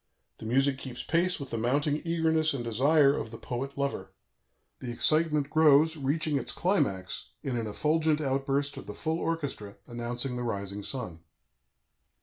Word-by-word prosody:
The 110 - -6
music 135 +3 +2
keeps 125 -3 -7
pace 175 +2 +1
with 140 -2 -7
the 115 - -2
mounting 145 +6 +1
eagerness 160 -2 +1
and 125 - -3
desire 140 +5 +4
of 115 - -4
the 115 - -9
poet 135 +5 -5
lover; 140 -9 -2 0.7
the 125 - -6
excitement 150 +2 +2
grows, 155 0 +5
reaching 150 +1 0
its - - -5
climax 100 - -1
in 130 - -2
an 115 -2 -2
effulgent 155 +7 +1
outburst 140 0 -1
of - - -9
the - - -6
full 160 0 -2
orchestra, 140 -13 -3
announcing 120 +2 -3
the 125 - -3
rising 100 -3 -3
sun. 110 -8 -5
140 Hz, 155 wpm, -29 LUFS, 120-155 Hz, 0.7 s, grows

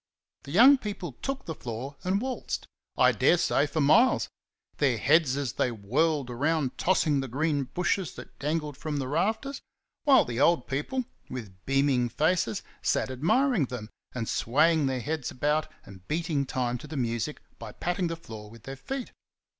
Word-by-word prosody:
The 140 - -8
young 255 - +7
people 205 - -5
took 270 0 -3
the 160 - -4
floor 125 +1 -6
and 190 +2 +1
waltzed, 260 +2 -3 0.3
I - - +6
dare 175 - +4
say, 150 -3 +2
for 155 +2 -1
miles 230 - +4 0.5
their 130 -5 +2
heads 145 +1 +3
as 140 -5 -2
they - - +1
whirled 130 +6 0
around 145 +2 0
tossing 160 -6 +2
the 135 - -3
green 145 +2 0
bushes 180 +2 -1
that - - -12
dangled 150 0 -2
from 150 -1 -3
the 135 -2 -2
rafters; 220 - -1 0.4
while 280 -2 +6
the 120 0 -4
old 145 -2 +3
people, 195 - -2 0.2
with 100 -7 -8
beaming 135 -3 +2
faces, 115 - +1 0.2
sat - - 0
admiring 175 - +2
them, 120 -4 -7 0.2
and 115 -3 -2
swaying 150 +4 +3
their 130 -1 -1
heads 150 -1 -3
about 150 +4 0
and 95 -2 -14
beating 155 -3 -1
time 125 -1 -1
to - - -10
the 155 - -6
music 120 +3 -2 0.2
by 115 -2 -7
patting 175 - -1
the 165 - -3
floor 110 -9 -10
with 115 0 -15
their 135 +2 -6
feet. 265 - -5
145 Hz, 170 wpm, -28 LUFS, 125-170 Hz, 0.5 s, young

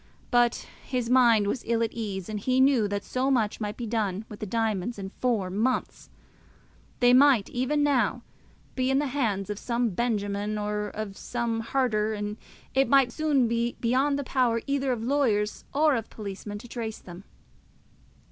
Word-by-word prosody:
But 240 -1 +2 0.2
his 250 -2 -2
mind 235 -5 +5
was 215 +5 -1
ill 230 0 +1
at 225 - -1
ease; 200 -5 -4
and 215 -1 -4
he 255 +5 +1
knew 260 -5 +4
that 200 0 -3
so 255 +1 -1
much 225 -5 +1
might 210 0 -3
be 240 - -4
done 215 -3 -2
with 210 - -9
the 215 - -4
diamonds 225 0 -1
in 190 -1 -6
four 220 -7 0
months! 230 +7 -1 0.9
They 245 0 +6
might 260 -5 +5
even 275 +4 0
now 250 -4 +1 0.5
be 255 0 0
in 270 - +3
the 295 - +1
hands 220 -8 -1
of 205 - -5
some 235 -2 -1
Benjamin 205 -1 -1
or 210 0 -2
of 210 -1 -6
some 235 -2 -2
Harter, 225 -3 0
and 205 0 -4 0.4
it 270 +1 +2
might 275 -3 +5
soon 290 -4 +2
be 235 +1 -1
beyond 265 +4 +2
the 285 - -2
power 250 -3 +1
either 275 -1 0
of 230 -3 -2
lawyers 230 -6 0
or 300 0 +3
of 225 -2 -4
policemen 205 0 -7
to 230 - -11
trace 225 -2 -5
them. 175 +1 -11
230 Hz, 175 wpm, -27 LUFS, 210-255 Hz, 0.9 s, They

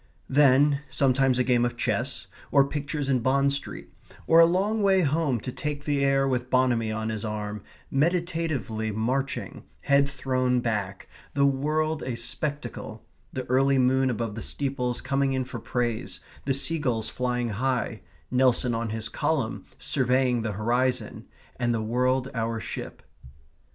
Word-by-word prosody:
Then, 140 +1 +5
sometimes 135 -2 +2
a 125 - +3
game 125 -1 +2
of 120 0 -1
chess; 120 +3 -1 0.3
or 140 -2 +5
pictures 145 0 -3
in 130 -2 +2
Bond 140 +3 +2
Street, 140 - -5 0.3
or 165 - +6
a 165 - +8
long 200 +5 +1
way 195 -2 +4
home 150 -5 +1
to 125 - -5
take 145 +2 -4
the 145 -2 +1
air 135 0 +3
with 125 -1 -1
Bonamy 125 -4 +2
on 110 0 -2
his 110 -1 -4
arm, 105 -1 -4 0.3
meditatively 155 - 0
marching, 125 +6 -2 0.2
head 140 0 +3
thrown 130 -2 0
back, 105 -6 -3 0.3
the 140 0 +4
world 155 +3 0
a 125 - -3
spectacle, 120 -2 -4 0.3
the 130 -1 -4
early 135 +2 +3
moon 130 +1 +3
above 115 -3 -2
the 115 - -6
steeples 130 -3 -2
coming 135 0 0
in 130 0 0
for 125 -1 -7
praise, 120 0 -2 0.3
the 135 - +1
sea 165 +4 +1
gulls 115 -6 -1
flying 125 -1 -1
high, 120 0 -1 0.3
Nelson 125 -1 +3
on 115 0 -2
his 110 0 -2
column - - -1
surveying 125 -2 +1
the 110 -2 -2
horizon, 120 +5 -1 0.3
and 120 -1 +1
the 110 - -2
world 125 +3 +1
our 115 -1 -2
ship. - - -7
130 Hz, 155 wpm, -26 LUFS, 115-140 Hz, 0.3 s, a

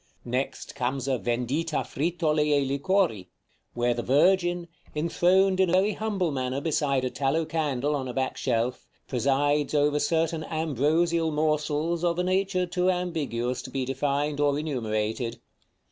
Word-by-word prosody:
Next 125 +3 -3
comes 130 0 -2
a 130 -3 +1
"Vendita 130 +7 -1
Frittole 155 0 0
e 145 -2 +2
Liquori," 140 - 0 0.5
where 120 0 +2
the 120 - -3
Virgin, 175 +6 +2 0.3
enthroned 185 +4 +3
in 190 -2 +4
a - - 0
very 195 +3 +3
humble 200 -6 -1
manner 130 -1 -2
beside 140 -3 0
a 125 - -2
tallow 145 +4 0
candle 150 -3 -1
on 135 -2 -3
a 125 - -5
back 130 -1 -1
shelf, 125 0 -1 0.2
presides 140 +3 +1
over 145 0 +3
certain 160 +1 0
ambrosial 160 +2 +1
morsels 155 +2 0
of 170 -1 +1
a 180 - +1
nature 185 0 +1
too 180 +1 0
ambiguous 150 -9 -1
to - - -9
be 130 0 -2
defined 140 +2 -1
or 145 -1 +2
enumerated. 115 -4 -2
150 Hz, 145 wpm, -27 LUFS, 130-170 Hz, 0.5 s, in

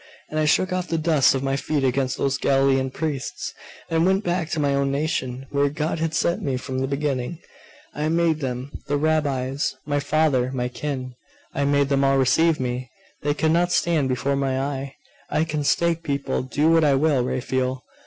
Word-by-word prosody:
And 155 - -2
I 155 - +2
shook 185 +5 +2
off 185 -1 -2
the 165 - -1
dust 155 -5 +3
of 135 - -2
my 135 0 0
feet 145 +1 -1
against 130 0 0
those 135 -1 0
Galilean 135 -1 +2
priests, 145 -1 -4 0.3
and 165 0 +1
went 190 +3 +2
back 175 -2 -1
to 160 - -2
my 140 -1 +2
own 140 0 +1
nation, 135 -3 -2
where 140 0 +2
God 155 +2 -2
had 160 0 -1
set 170 - +1
me 135 -3 -1
from 130 0 -4
the 135 - 0
beginning. 140 +1 -2 0.6
I 150 +1 -1
made 165 -1 +2
them 130 -1 -4 0.2
the 145 0 +1
Rabbis, 145 -3 0
my 145 -1 0
father, 145 -4 +1
my 125 -1 -1
kin 130 -1 -4 0.4
I 140 - 0
made 140 0 +2
them 140 -1 +2
all 135 0 +3
receive 160 +5 +3
me. 125 0 -3 0.3
They 145 0 0
could 160 +1 +1
not 175 +2 +2
stand 160 -7 +2
before 135 +2 0
my 135 -1 0
eye. 135 0 -3 0.3
I 155 - +1
can 155 -2 -2
stake 170 +3 +2
people 140 -3 -2
do 145 +5 +1
what 165 -1 +5
I 145 -2 +4
will, 140 -2 +2
Raphael! 130 +1 -2
140 Hz, 195 wpm, -23 LUFS, 130-155 Hz, 0.6 s, what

